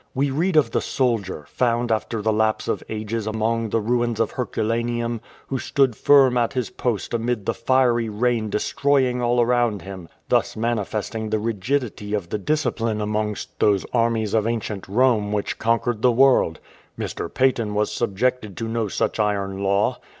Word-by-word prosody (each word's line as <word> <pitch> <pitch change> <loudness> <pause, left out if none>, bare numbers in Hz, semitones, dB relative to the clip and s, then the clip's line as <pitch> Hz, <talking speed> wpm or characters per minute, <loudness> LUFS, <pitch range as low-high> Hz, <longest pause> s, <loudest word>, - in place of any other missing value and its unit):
We 140 +1 +1
read 165 +6 0
of 155 - +4
the - - +1
soldier, 110 - -1
found 120 -1 0
after 110 0 -1
the 110 0 +2
lapse 110 0 +1
of - - -1
ages 110 0 -3
among 110 +1 -1
the 115 - +1
ruins 120 +1 0
of 115 - +1
Herculaneum, 115 -1 -2 0.2
who 135 - -3
stood 135 -3 +1
firm 135 -2 +5
at 120 +2 0
his 125 -4 -2
post 120 -4 -2
amid 115 -2 -1
the - - 0
fiery 120 -1 +2
rain 110 0 0
destroying 130 +2 +1
all 120 0 +2
around 120 -3 +2
him, 95 -3 -9 0.2
thus - - +1
manifesting 110 -1 -2
the 110 - +1
rigidity 110 0 -2
of 95 -5 -4
the 105 - -2
discipline 115 -4 -1
amongst 105 0 -3
those 100 -2 +3
armies 115 -3 +1
of 110 -1 +2
ancient 110 -4 -3
Rome 110 -1 +2
which 105 -1 -2
conquered 115 0 0
the 125 - +5
world. 125 -9 +4 0.4
Mr. - - -4
Paton 115 -5 +1
was 105 0 +1
subjected 110 0 -1
to 115 - -3
no 115 -1 -1
such 100 - -1
iron 100 -2 -1
law. 100 +1 +1
115 Hz, 165 wpm, -23 LUFS, 105-125 Hz, 0.4 s, firm